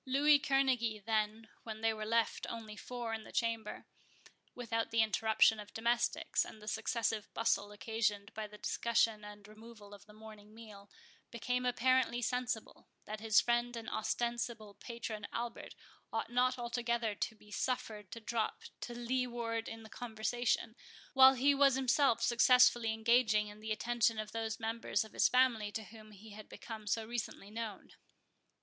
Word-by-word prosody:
Louis 285 +3 +4
Kerneguy 250 -7 +1
then, 220 0 -1
when 220 -1 -7
they 225 0 +2
were 215 -1 -5
left 230 0 +1
only 220 -2 -7
four 240 +1 -5
in 220 -1 -4
the - - -12
chamber, 230 -2 -2 0.7
without 230 -2 -2
the 230 -1 +3
interruption 220 0 +3
of 210 0 -10
domestics, 235 +2 +1
and 220 - -11
the 210 - -13
successive 220 -1 -1
bustle 225 -3 +1
occasioned 215 -1 -2
by 215 -1 -5
the 210 0 -13
discussion 225 -1 +1
and 205 -1 -11
removal 215 -1 -13
of 205 0 -14
the 210 - -15
morning 215 -1 -13
meal, 210 -3 -12 0.4
became 250 +2 -2
apparently 250 0 +2
sensible, 245 -1 -3 0.2
that 215 0 -6
his 220 0 +4
friend 240 0 0
and 225 -1 -7
ostensible 235 -1 -2
patron 225 -2 -6
Albert 235 0 -5 0.4
ought - - -3
not 255 +1 +2
altogether 235 -2 -1
to 220 +2 -3
be 210 -1 -19
suffered 215 -5 -3
to 230 - -6
drop 225 0 -2 0.2
to 240 - -6
leeward 240 -2 -2
in 225 0 -8
the - - -11
conversation, 225 0 -2 0.4
while 265 0 +9
he 275 +3 +4
was 275 -1 +5
himself 260 -2 +2
successfully 240 -1 +5
engaging 220 -2 +2
the 220 0 -6
attention 230 0 +1
of 215 0 -4
those 225 -1 -3
members 225 0 -1
of 220 - -15
his - - +4
family 245 -5 +3
to 220 +1 -4
whom 215 +1 -13
he 215 +1 -13
had 210 +1 -11
become 220 -2 -9
so 220 +2 0
recently 220 -3 -5
known. 220 -2 -6
225 Hz, 160 wpm, -34 LUFS, 215-240 Hz, 0.7 s, while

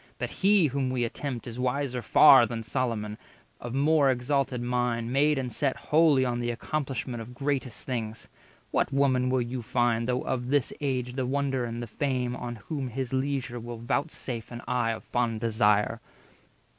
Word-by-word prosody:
But - - -3
he 200 -2 +4
whom 135 -2 0
we 125 -1 0
attempt 120 +1 -4
is 120 0 -7
wiser 130 0 -1
far 135 -2 +7
Than 115 -2 -4
Solomon, 110 -2 -2 0.4
of 120 +1 -6
more 145 0 +4
exalted 130 0 0
mind, 120 -1 -1
Made 145 +2 +3
and 125 -2 -3
set 140 -3 0
wholly 150 -4 +4
on 120 -1 -1
the 120 0 -1
accomplishment 125 -1 -3
Of 120 +2 -10
greatest 135 -3 -2
things. 115 -3 -4 0.4
What - - +1
woman 130 -2 +2
will 130 -1 +2
you 120 +1 -4
find, 120 0 +1
Though 125 0 0
of 125 -2 -2
this 140 -1 +1
age 130 -3 -1
the 130 -1 -2
wonder 135 -2 0
and 120 0 -4
the - - -3
fame, 125 +1 -2
On 120 -1 -5
whom 135 +5 -5
his 130 +1 -4
leisure 130 -2 -1
will 120 0 -7
voutsafe 120 -1 -3
an 120 -1 -7
eye 125 -2 0
210 115 - 0
Of - - -11
fond 120 -2 -1
desire? 110 -1 +2
125 Hz, 180 wpm, -28 LUFS, 120-135 Hz, 0.4 s, far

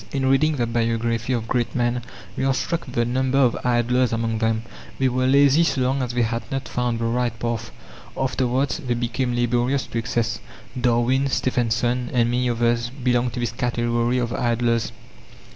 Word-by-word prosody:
In 135 -1 -1
reading 155 +3 +3
the 120 -4 0
biography 115 +1 -1
of 115 -2 -2
great 120 -1 -1
men, 120 0 0 0.3
we - - -2
are 135 0 +2
struck 170 +1 -2
with 125 - -9
the 120 - +2
number 130 +2 0
of 130 -4 +4
"idlers" 125 0 +2
among 115 -1 -1
them. 110 0 0 0.3
They 135 - +2
were 130 +1 0
lazy 140 +3 +5
so 140 -5 0
long 130 +2 +1
as 125 -1 -2
they 120 - +3
had 115 +1 -1
not 135 -1 -3
found 125 -1 -1
the 115 - -2
right 120 0 0
path; 115 -1 -3 0.5
afterwards 130 +1 0
they 125 -6 -2
became 120 +1 -1
laborious 120 +3 +1
to 115 - -3
excess. 115 -1 -1 0.3
Darwin, 125 +2 +2
Stephenson, 125 -1 0
and 120 -1 +2
many 125 0 +1
others 120 0 +1
belonged 125 -2 0
to - - -4
this 120 -2 -1
category 120 0 0
of 120 -1 -1
idlers. 115 -2 0
120 Hz, 180 wpm, -23 LUFS, 115-130 Hz, 0.5 s, lazy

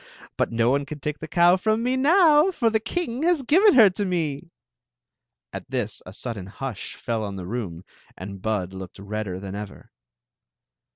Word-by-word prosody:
But - - 0
no 115 +1 +2
one 140 +1 0
can 150 +1 -7
take 150 +1 -4
the 155 - -7
cow 175 +2 +4
from 215 +4 0
me 250 +1 +1
now, 310 +3 +5
for 235 -11 +1
the 220 - +2
king 245 +2 -3
has 335 -3 +2
given 370 - +5
her 225 -5 +9
to 205 +3 -3
me." 165 -4 -2 1.0
At - - -7
this - - -3
a - - -8
sudden 105 -2 -6
hush 115 +1 -6
feU 115 -2 -3
on 100 -2 -4
the 95 -2 -6
romu 95 -5 -5 0.3
and 95 +1 -8
Bikl 100 -4 -2
looked 95 -1 -9
redder 100 -2 -5
than 95 0 -7
ever. 100 -1 -8
140 Hz, 180 wpm, -24 LUFS, -, 1.0 s, her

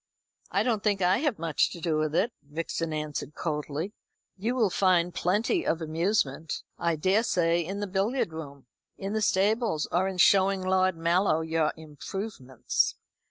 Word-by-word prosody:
"I - - +1
don't 225 -4 0
think 205 -2 +1
I 180 +4 +3
have 285 -6 0
much 165 -2 +1
to 175 - -8
do 160 -2 0
with 155 0 -1
it," 225 +7 +1
Vixen 160 +2 -4
answered 150 -1 -4
coldly. 155 +4 -3 0.4
"You 225 +6 -2
will 220 -7 +2
find 180 -2 +2
plenty 210 - +1
of 165 - 0
amusement, 160 -2 -1 0.2
I 170 -1 +1
daresay, 175 -1 +2
in 195 +5 -5
the - - 0
billiard 195 0 -1
room, 140 -4 -8 0.3
in 195 +2 -4
the 220 - 0
stables, 210 -4 +1
or 185 +2 +2
in 190 -1 -4
showing 195 +1 +4
Lord 185 -1 +2
Mallow 170 0 +2
your 160 -1 +1
improvements." 150 - -3
180 Hz, 160 wpm, -28 LUFS, 160-200 Hz, 0.4 s, showing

